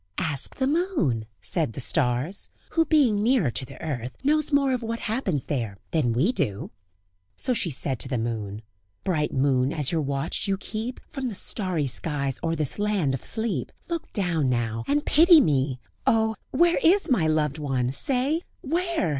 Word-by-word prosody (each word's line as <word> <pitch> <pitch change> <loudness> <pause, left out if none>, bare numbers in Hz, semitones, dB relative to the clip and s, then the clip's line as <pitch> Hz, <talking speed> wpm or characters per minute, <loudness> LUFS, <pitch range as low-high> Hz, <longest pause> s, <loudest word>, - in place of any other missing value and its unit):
"Ask 145 -4 -3
the 265 - 0
moon," 275 - 0
said 155 -10 -1
the - - -6
stars; 135 +6 -1 0.2
"who 325 -1 +3
being 270 -10 +3
nearer 225 - +3
to 130 - -3
the - - -12
earth, 125 -5 -4
knows 305 +2 +2
more 280 -2 +3
of 250 - -1
what 230 0 -3
happens 210 - -1
there 115 -9 -2
than 150 -8 +2
we 135 - +2
do." 135 - -2 0.7
So 255 - 0
she 190 - +1
said 130 -3 -2
to - - +1
the 130 -1 -1
moon: 110 -2 -3 0.4
"Bright 155 -6 0
moon, 130 -1 +2
as 150 -5 +1
your 165 -2 +1
watch 140 +6 -2
you 195 -1 +1
keep, 220 +5 -5
From 270 -4 -4
the 225 - -4
starry 185 -7 -1
skies, 140 +1 -1
o'er 165 0 0
this 155 +3 -2
land 205 -9 +1
of 130 - -4
sleep, 220 - -1 0.2
Look 335 -1 -4
down 170 - +1
now, 115 -2 -1
and 295 +1 +1
pity 335 +2 +7
me! 135 - +1 0.3
Oh! 220 -1 +3
where 345 +1 +3
is 380 +5 +4
my 185 -12 +3
loved 155 -1 +1
one? 130 -4 0
say! 270 - 0 0.2
Where? 335 - 0
165 Hz, 180 wpm, -25 LUFS, -, 0.7 s, pity